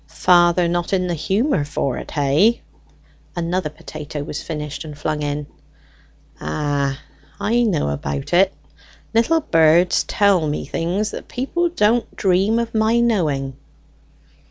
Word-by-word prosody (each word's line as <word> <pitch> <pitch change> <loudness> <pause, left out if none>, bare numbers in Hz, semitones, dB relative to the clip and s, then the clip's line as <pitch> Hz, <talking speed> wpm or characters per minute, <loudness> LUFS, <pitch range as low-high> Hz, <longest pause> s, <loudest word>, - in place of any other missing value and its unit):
"Father 175 0 +3
not 175 +2 -1
in 185 -1 +2
the 175 - -1
humour 195 - 0
for't, 140 -2 -3
hey?" 155 +11 +2 0.7
Another 175 -1 -1
potato 150 -1 -7
was 145 0 -5
finished 150 -2 -5
and 150 -2 -9
flung 150 0 -2
in. 145 0 -2 0.9
"Ah, 140 - -1 0.4
I 235 +3 +1
know 200 - +1
about 70 - -4
it. 190 +2 +5 0.6
Little 320 +9 +3
birds 165 - +4
tell 195 -6 +2
me 150 - -3
things 190 +6 -2
that - - -8
people 340 +8 -1
don't 235 -6 +1
dream 195 +4 +2
of 235 -1 -2
my 220 +1 +2
knowing." 150 - 0
175 Hz, 130 wpm, -20 LUFS, 150-210 Hz, 0.9 s, it